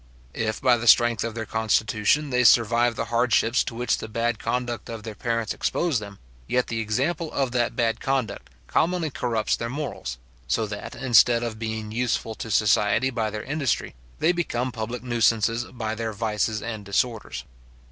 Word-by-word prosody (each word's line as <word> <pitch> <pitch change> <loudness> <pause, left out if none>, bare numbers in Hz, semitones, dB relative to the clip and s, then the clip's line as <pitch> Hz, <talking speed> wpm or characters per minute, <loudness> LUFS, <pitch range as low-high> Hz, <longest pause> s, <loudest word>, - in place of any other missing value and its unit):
If 110 -1 -2
by 125 -3 +4
the 120 +1 -4
strength 120 -1 +5
of 115 -1 -4
their 115 -1 -3
constitution, 110 +6 +1
they 125 0 +3
survive 120 0 +4
the 115 - -2
hardships 120 0 +3
to 115 - -5
which 120 +1 0
the - - -6
bad 115 +1 -1
conduct 120 -3 -3
of 115 -2 -6
their 110 0 -6
parents 115 +1 -2
exposes 165 -9 0
them, 100 -2 -9 0.3
yet 125 0 +1
the 115 - -2
example 135 +10 -1
of 135 -3 0
that 120 -1 0
bad 115 -2 +1
conduct 130 -6 -2 0.2
commonly 165 - +1
corrupts 115 -4 0
their 115 - -4
morals; 130 - -5 0.3
so 110 - +1
that, 105 -1 -7
instead 120 -1 +4
of 110 -2 -4
being 110 -1 -4
useful 115 -1 -1
to 115 - -7
society 105 +4 +3
by 115 -3 -1
their 105 0 -5
industry, 140 -3 -1 0.2
they 170 - +3
become 130 -8 -2
public 115 +1 -5
nuisances 115 -1 +2
by 110 -3 -4
their 110 0 -3
vices 110 0 -1
and 110 -3 -5
disorders. 110 +3 -1
115 Hz, 175 wpm, -25 LUFS, 110-125 Hz, 0.3 s, strength